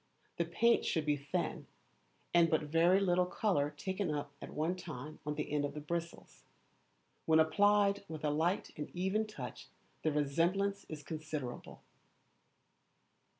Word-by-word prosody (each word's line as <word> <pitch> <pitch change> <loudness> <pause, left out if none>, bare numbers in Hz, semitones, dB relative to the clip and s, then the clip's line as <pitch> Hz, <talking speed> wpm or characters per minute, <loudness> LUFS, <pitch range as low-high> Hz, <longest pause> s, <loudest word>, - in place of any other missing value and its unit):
The 170 - +1
paint 230 +8 +3
should 160 -2 0
be 150 -1 +3
thin, 140 0 -3 0.7
and 170 -1 +6
but 155 -1 +2
very 165 +5 +4
little 180 -2 +2
colour 180 -8 +1
taken 190 +5 -3
up 145 -1 -2
at - - -7
one 160 +4 -1
time 155 -4 -8
on 150 - -1
the 150 -1 -3
end 150 -1 +1
of 145 - -3
the - - -3
bristles. 170 +3 -5 0.9
When 160 0 +6
applied 200 +4 +4
with 155 -1 -5
a 150 - +2
light 165 +6 0
and 150 0 -5
even 190 +5 0
touch 215 - -8 0.3
the 155 - +1
resemblance 170 +8 +1
is 150 -2 -7
considerable. 150 -4 -6
160 Hz, 150 wpm, -34 LUFS, 150-185 Hz, 0.9 s, and